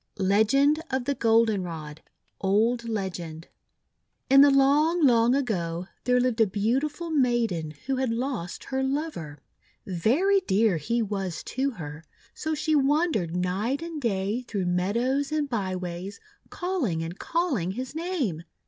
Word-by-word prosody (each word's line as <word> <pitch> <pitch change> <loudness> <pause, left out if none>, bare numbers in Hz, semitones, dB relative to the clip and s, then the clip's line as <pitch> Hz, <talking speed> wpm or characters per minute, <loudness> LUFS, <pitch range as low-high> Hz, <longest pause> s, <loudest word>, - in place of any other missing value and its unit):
LEGEND 220 +10 +3
OF 260 -2 -1
THE 280 - +1
GOLDENROD 185 - 0 0.4
Old 230 +4 +1
Legend 175 -6 -4 0.8
IN 275 0 +9
the 285 - +8
long, 290 +5 +4
long 240 -1 +4
ago, 180 -9 -2 0.2
there 250 0 +3
lived 245 -2 +1
a 220 - +5
beautiful 270 - -1
maiden 230 - +1
who 265 +1 -1
had 260 -1 0
lost 230 -6 -3
her 265 0 -2
lover. 265 - -3 0.5
Very 265 - +2
dear 215 - +2
he 230 +10 -1
was 195 -4 -4
to 270 +2 -1
her; 160 - -8 0.3
so 315 0 -3
she 310 +1 0
wandered 280 - +1
night 200 - -1
and 330 -3 -6
day 205 0 -1
through 200 -4 -2
meadows 235 +11 0
and 305 -2 0
by 200 -7 -2
ways 180 +3 -6 0.3
calling 290 - -2
and 170 +4 -7
call 340 -3 0
ing 185 -2 -2
his 255 +5 -5
name. 315 - -2
230 Hz, 140 wpm, -26 LUFS, 185-280 Hz, 0.8 s, IN